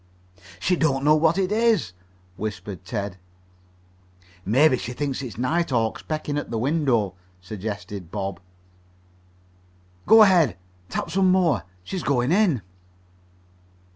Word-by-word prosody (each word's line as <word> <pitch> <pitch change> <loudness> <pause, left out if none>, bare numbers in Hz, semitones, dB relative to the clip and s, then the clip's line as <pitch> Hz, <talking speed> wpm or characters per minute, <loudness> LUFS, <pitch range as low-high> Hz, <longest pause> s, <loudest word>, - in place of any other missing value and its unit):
"She 180 - +1
don't 140 -5 +1
know 150 +1 +5
what 160 +3 +3
it 190 0 0
is," 220 - +2 0.4
whispered 100 -2 -6
Ted. 100 0 -4 1.3
"Maybe 130 +9 +4
she 125 - -5
thinks 140 0 -3
it's 125 -6 -7
night 165 +8 0
hawks 115 -4 0
pecking 150 -2 -3
at - - -7
the 115 - -2
window," 125 - +1 0.3
suggested 100 -1 -6
Bob. 95 -2 -4 1.7
"Go 220 0 +9
ahead. 175 - +4 0.3
Tap 170 - -3
some 190 +1 +3
more. 165 - +2 0.2
She's 185 - -4
going 130 -2 +1
in." 180 - +2
135 Hz, 120 wpm, -24 LUFS, 105-165 Hz, 1.7 s, Go